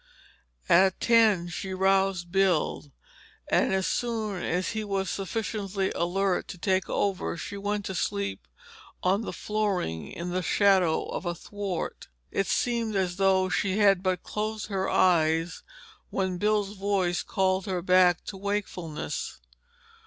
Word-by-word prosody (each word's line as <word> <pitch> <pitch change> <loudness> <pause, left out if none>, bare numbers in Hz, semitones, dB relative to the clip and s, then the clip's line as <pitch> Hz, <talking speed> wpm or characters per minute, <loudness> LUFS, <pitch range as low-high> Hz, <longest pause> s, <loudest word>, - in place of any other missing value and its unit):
At 190 +2 +4
ten 220 -7 +4
she 185 +2 -5
roused 190 -2 +1
Bill, 180 -6 +1 0.6
and - - +3
as 190 -1 +1
soon 220 -6 -2
as 180 +2 -1
he 220 -1 -3
was 195 -2 -2
sufficiently 195 -1 -2
alert 185 +2 0
to - - -8
take 185 +2 0
over 190 -3 -1
she 200 - -6
went 205 0 -2
to 190 - -3
sleep 100 - -2 0.6
on 190 +3 +2
the - - -4
flooring 200 - -2
in 175 +1 -5
the 185 +1 0
shadow 185 -3 +3
of 180 - -5
a 175 - -1
thwart. 200 0 -5 0.2
It 195 - 0
seemed 235 -3 0
as 185 -2 0
though 190 -1 +3
she 190 +1 0
had 200 -3 +4
but 185 -2 -1
closed 215 0 -3
her 195 -1 -1
eyes 165 -1 +2 0.5
when 190 -2 -2
Bill's 210 -1 +1
voice 195 -3 0
called 190 0 0
her 180 -3 -2
back 180 -1 +4
to 195 - -6
wakefulness. 190 -5 -4
190 Hz, 140 wpm, -27 LUFS, 180-205 Hz, 0.6 s, At